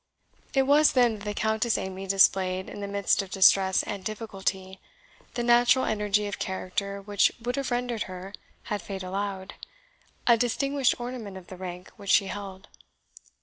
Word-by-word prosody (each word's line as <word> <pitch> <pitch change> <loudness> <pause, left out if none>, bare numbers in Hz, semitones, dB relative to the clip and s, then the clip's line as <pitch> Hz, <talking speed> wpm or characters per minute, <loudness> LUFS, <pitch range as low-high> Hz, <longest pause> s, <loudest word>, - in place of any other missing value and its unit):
It 270 - +5
was 290 +3 +5
then 240 -4 +3
that 200 - -10
the 210 - -2
Countess 220 +2 +1
Amy 190 0 -5
displayed, 190 -1 +3
in - - -8
the 200 - -3
midst 200 0 +1
of 195 - -8
distress 190 0 +4
and 200 -2 -5
difficulty, 195 -3 -4 0.6
the 240 - -1
natural 240 +2 +4
energy 210 -1 0
of 205 - -5
character 200 +1 -3
which 205 0 +3
would 245 +2 -3
have 275 -1 -2
rendered 245 -2 -2
her, 185 +2 -8 0.3
had 210 -1 -3
fate 195 -2 -6
allowed, 195 0 -4 0.7
a 235 -1 +6
distinguished 270 +3 +1
ornament 240 -5 -6
of 180 -2 -13
the 185 - -8
rank 180 0 -8
which 200 -2 -9
she 200 - +5
held. 195 0 -7
200 Hz, 165 wpm, -27 LUFS, 190-235 Hz, 0.7 s, a